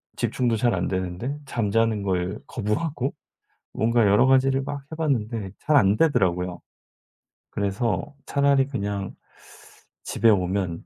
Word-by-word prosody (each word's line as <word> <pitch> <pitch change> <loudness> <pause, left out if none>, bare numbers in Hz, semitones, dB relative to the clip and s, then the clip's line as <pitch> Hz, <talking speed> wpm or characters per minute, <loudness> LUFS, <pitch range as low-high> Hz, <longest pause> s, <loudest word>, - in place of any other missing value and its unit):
집중도 120 -3 0
잘 120 +1 +1
안 90 -1 -1
되는데 95 +9 -3
잠자는 115 -3 0
걸 95 +1 -1
거부하고 130 +5 -2 0.6
뭔가 115 +1 +2
여러 105 +6 +5
가지를 135 0 +3
막 145 0 -5
해 - - -5
봤는데 115 -10 -1
잘 150 - +2
안 100 -6 +4
되더라고요. 90 - +1 0.9
'그래서 105 +8 -2
차라리 140 -1 +2
그냥 100 -6 -3 0.9
집에 115 - +2
오면 90 -3 0
115 Hz, 260 characters per minute, -24 LUFS, 95-135 Hz, 0.9 s, 여러